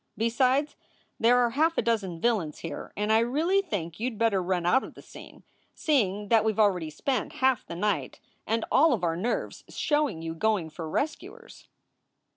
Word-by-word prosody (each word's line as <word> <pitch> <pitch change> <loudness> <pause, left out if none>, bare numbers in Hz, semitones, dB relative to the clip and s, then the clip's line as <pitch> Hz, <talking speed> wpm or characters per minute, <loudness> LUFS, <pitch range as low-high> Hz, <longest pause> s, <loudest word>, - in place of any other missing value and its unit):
Besides, 255 +6 +1 0.4
there 240 +2 +5
are 240 -1 +2
half 320 +6 +1
a - - +3
dozen 205 -7 -1
villains 200 -8 0
here, 165 - -6
and 210 +1 +1
I 220 - +5
really 310 +12 +1
think 175 - -5
you 240 +3 0
d 235 - -10
better 215 -3 +1
run 180 -1 -1
out 260 +10 +3
of - - -10
the - - -12
scene, - - -13 0.3
seeing 210 -9 0
that 225 -2 +4
we 220 - +2
ve 210 - -7
already 185 -7 +2
spent 255 - -2
half 260 -3 +1
the 170 - -8
night 205 +2 -2 0.3
and 225 +1 0
all 300 +2 +5
of 205 -7 -2
our 165 -1 +1
nerves 215 +8 -3
showing 295 - -1
you 165 0 -4
going 185 -2 0
for 160 0 -7
rescuers." 295 - -5
220 Hz, 190 wpm, -27 LUFS, 180-255 Hz, 0.4 s, there